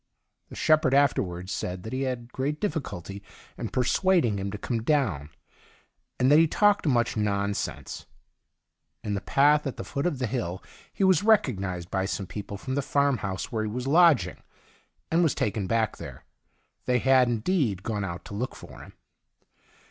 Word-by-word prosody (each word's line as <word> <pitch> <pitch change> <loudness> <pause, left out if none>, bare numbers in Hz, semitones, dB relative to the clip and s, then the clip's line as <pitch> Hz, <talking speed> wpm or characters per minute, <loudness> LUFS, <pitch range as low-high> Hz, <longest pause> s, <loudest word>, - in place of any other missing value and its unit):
The - - -10
shepherd 155 -4 +3
afterwards 95 -10 +1
said 90 0 -4
that 110 - -7
he 130 - -2
had 120 -1 -6
great 145 +3 -2
difficulty 100 - -4 0.3
in 115 - -5
persuading 130 - +2
him 100 +1 -3
to 105 - -5
come 115 +2 -3
down, 115 - 0 0.9
and 130 +2 +3
that 150 - +7
he 165 - +5
talked 205 +1 +2
much 120 -4 +1
nonsense. 100 -1 -2 1.0
In 105 - -2
the 100 - -2
path 145 +2 +3
at 135 - -5
the - - -5
foot 140 +4 -2
of 160 -6 -2
the 125 - -1
hill 95 -6 -3 0.3
he - - -2
was 190 -4 +4
recognised 100 - +1
by 95 -1 0
some 95 0 -3
people 100 +2 -7
fi 130 - -7
om - - 0
the 140 - 0
farmhouse 130 -10 -1
where 110 -2 -1
he 110 - -2
w^as 125 +4 -4
lodging, 165 -1 +4 0.7
and 165 +2 +3
was 165 -4 +2
taken 105 -2 -1
back 110 0 0
there. - - -10 0.6
They 125 - +2
had, 130 0 +4
in 115 -2 -1
deed, 115 - 0
gone 105 -3 -2
out 85 -2 -6
to - - -9
look 120 +6 -3
for - - -12
him. - - -13
120 Hz, 180 wpm, -26 LUFS, 100-145 Hz, 1.0 s, that